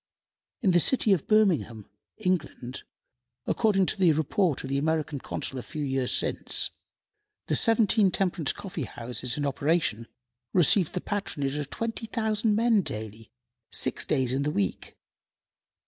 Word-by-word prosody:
In 195 - +4
the 175 - +4
city 220 +1 +3
of 175 - -2
Birmingham, 175 - +2 0.3
England, 160 - -2 0.6
according 205 -4 +2
to - - 0
the 180 -3 +5
report 160 - 0
of 135 - -6
the 140 - +1
American 155 -1 -1
Consul 130 +1 -4
a - - -5
few 155 +3 -6
years 135 -2 -1
since, - - -1 0.7
the - - 0
seventeen 225 -3 +4
temperance 180 -5 0
coffee 175 -8 -6
houses 125 +2 -3
in 145 - -1
operation 140 -5 0 0.5
received 180 0 +4
the 180 - -2
patronage 145 -9 -3
of 145 -2 -4
20,000 220 - -1
men 225 -1 +3
daily, 110 - -7 0.4
six - - +3
days 130 -1 0
in 135 - 0
the 145 - 0
week. 100 -10 -3
160 Hz, 140 wpm, -27 LUFS, 135-205 Hz, 0.7 s, the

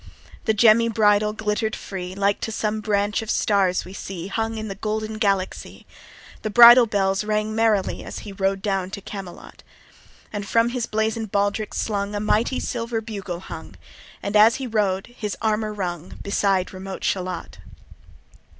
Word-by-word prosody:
The 220 - +3
gemmy 230 +1 +5
bridle 210 -1 +3
glitter'd 215 0 -2
free, 185 -1 -6
Like 200 0 +1
to 225 - -3
some 215 0 -2
branch 205 0 0
of 220 - -8
stars 195 -3 +2
we 185 - -10
see 190 -2 -6
Hung 225 +2 -2
in 215 0 -4
the 195 - -4
golden 215 +2 -3
Galaxy. 195 -3 -1 0.6
The 215 - -3
bridle 240 +2 +9
bells 195 -1 +1
rang 215 0 -1
merrily 220 -3 +1
As - - -7
he 205 - -7
rode 195 0 -1
down 195 -3 -1
to - - -9
Camelot: 195 -3 -9 0.7
And 205 -1 -4
from 230 +2 +3
his 240 -1 -3
blazon'd 220 0 -1
baldric 205 +1 0
slung 205 -1 -2
A - - -1
mighty 215 +4 +1
silver 230 -2 -2
bugle 200 -6 -6
hung, - - -9 0.5
And 200 +1 -3
as 220 +3 +7
he 265 - -4
rode 205 -5 0
his 215 -4 -6
armour 215 -1 0
rung, 180 -4 -5
Beside 195 -2 0
remote 190 0 -7
Shalott. 180 -2 -3
210 Hz, 160 wpm, -23 LUFS, 195-220 Hz, 0.7 s, bridle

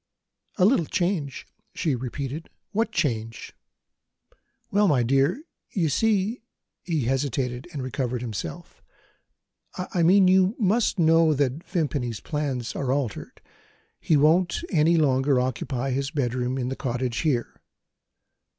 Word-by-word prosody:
"A 185 - +4
little 200 - +3
change?" 175 -7 -2 0.3
she 155 - 0
repeated. 135 +5 -5 0.2
"What 225 +2 0
change?" 115 -8 -2 1.2
"Well, 205 +1 +3
my 135 -8 +3
dear, 135 - +1 0.3
you 170 -6 +1
see 215 - +1 0.2
" - - -60
He 165 -4 -1
hesitated 130 0 -1
and 140 -5 -5
recovered 130 -2 -2
himself. 95 -9 -6 1.0
"I 180 -1 -2
mean, 185 +3 +6
you 190 +3 +4
must 220 +1 +1
know 165 -2 +4
that 140 +3 -1
Vimpany's 145 - -1
plans 140 -6 -3
are 135 -2 -1
altered. 135 -6 -3 0.6
He 155 - +2
won't 170 - +3
any 165 -1 +4
longer 135 -3 +3
occupy 130 +1 -2
his 135 +1 -1
bedroom 130 -3 -1
in 125 -1 -2
the 135 - -3
cottage 125 -3 -2
here." 135 -7 -1
145 Hz, 125 wpm, -25 LUFS, 125-175 Hz, 1.2 s, mean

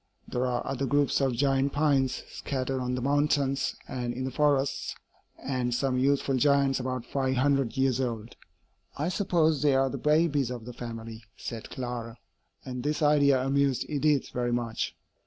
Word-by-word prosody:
There 125 +1 -1
are 120 -1 -1
other 135 0 -2
groups 145 +1 +2
of 135 -2 +2
giant 135 +1 +1
pines 140 -3 +1
scattered 130 -1 -3
on 125 0 -1
the 125 - -3
mountains 140 -1 +1
and 120 -2 -3
in 130 - -3
the 130 - -3
forests, 140 0 +1 0.4
and 125 -2 -2
some 130 0 0
youthful 135 0 +2
giants 140 0 +3
about 130 -1 -3
five 130 0 -1
hundred 135 -2 +1
years 130 -1 +2
old." 115 -2 -4 0.6
"I 150 +4 0
suppose 170 -6 +2
they 145 -2 +4
are 135 0 +2
the - - -4
babies 150 -4 +2
of 120 -3 -6
the 125 - -7
family," 115 -2 -7
said 115 -2 -6
Clara; 120 -2 -5 0.5
and 125 -1 -5
this 150 +3 -1
idea 140 -3 +4
amused 140 -2 +1
Edith 150 -1 +1
very 120 -1 -1
much. 120 -2 -2
135 Hz, 165 wpm, -28 LUFS, 125-140 Hz, 0.6 s, they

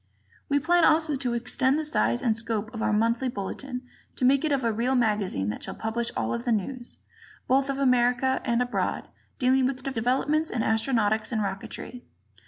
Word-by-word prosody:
We 285 - +3
plan 340 +4 +3
also 315 -1 +4
to 255 -3 -1
extend 260 +3 +1
the 310 - -2
size 115 - 0
and 225 -2 +2
scope 225 -1 -3
of 225 - -5
our - - +1
monthly 230 +4 +1
Bulletin, 250 +4 -5 0.3
to 255 - 0
make 275 +2 +4
of 310 - 0
it - - -1
a 230 - +2
real 245 +4 0
magazine 210 - 0
that 105 - -5
shall - - -5
publish 230 +1 -2
all - - -1
the 240 +1 -2
news, 240 +4 -3 0.5
both 270 +1 +2
of 275 - -1
America 250 -1 +2
and 235 0 +1
abroad, 245 - -2 0.3
dealing 260 0 +3
with 260 -1 -4
developments 270 +5 0
in 230 -2 -1
astronautics 220 -1 +1
and 220 -3 0
rocketry. 200 +5 -6
245 Hz, 185 wpm, -26 LUFS, 220-265 Hz, 0.5 s, also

